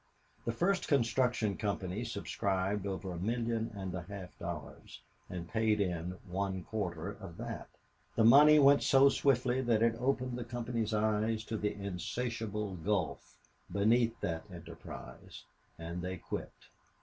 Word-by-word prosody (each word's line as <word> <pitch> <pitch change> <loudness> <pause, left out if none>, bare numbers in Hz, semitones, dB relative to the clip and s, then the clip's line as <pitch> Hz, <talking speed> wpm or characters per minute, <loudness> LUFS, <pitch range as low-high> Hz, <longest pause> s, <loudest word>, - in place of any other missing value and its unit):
The 115 - +1
first 185 +10 +1
construction 120 -5 +2
company 100 0 -2
subscribed 100 -2 -1
over 95 -1 -4
a 85 - -5
million 115 +2 -1
and 95 -2 -4
a 90 - -3
half 95 +1 -8
dollars, 85 -3 -7 0.3
and 90 -2 -5
paid 110 +1 +1
in 90 -2 -1
one 95 0 -2
quarter 95 -4 -3
of 95 -6 -10
that. - - -6 0.5
The 115 - +4
money 145 +6 +8
went 140 -1 +7
so 135 +1 +6
swiftly 130 -2 +2
that 115 -3 +2
it 115 -1 +4
opened 125 -1 0
the - - -3
company's 120 -2 -2
eyes 110 +1 +1
to 110 +1 -4
the 105 -1 -1
insatiable 105 +1 -3
gulf 85 -5 -2 0.4
beneath 115 +3 +3
that 80 -1 -2
enterprise, 85 -7 -10 0.3
and 85 +2 -5
they 90 +1 -3
quit. - - -5
105 Hz, 140 wpm, -33 LUFS, 95-120 Hz, 0.5 s, money